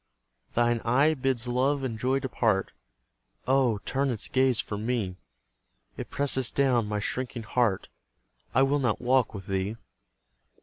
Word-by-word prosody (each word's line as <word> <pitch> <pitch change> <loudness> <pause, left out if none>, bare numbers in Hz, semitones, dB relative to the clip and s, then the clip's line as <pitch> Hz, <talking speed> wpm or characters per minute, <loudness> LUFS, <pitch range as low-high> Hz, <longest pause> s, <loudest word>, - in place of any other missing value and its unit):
Thine 120 -1 +2
eye 135 +7 +3
bids 130 -4 -1
love 135 +3 +1
and 115 -4 -3
joy 130 +3 +1
depart: 115 -7 0 0.7
Oh, 130 -4 +3
turn 135 +1 0
its 115 -5 -2
gaze 130 -3 +2
from 105 0 -3
me! 110 -6 -2 0.8
It - - -7
presses 130 -3 0
down 125 -5 +2
my 105 0 -2
shrinking 125 +2 -3
heart; 110 -3 0 0.7
I 135 - +5
will 140 +2 +2
not 125 -6 0
walk 125 -2 +2
with 95 -2 -7
thee! 95 +2 -2
125 Hz, 140 wpm, -27 LUFS, 110-130 Hz, 0.8 s, I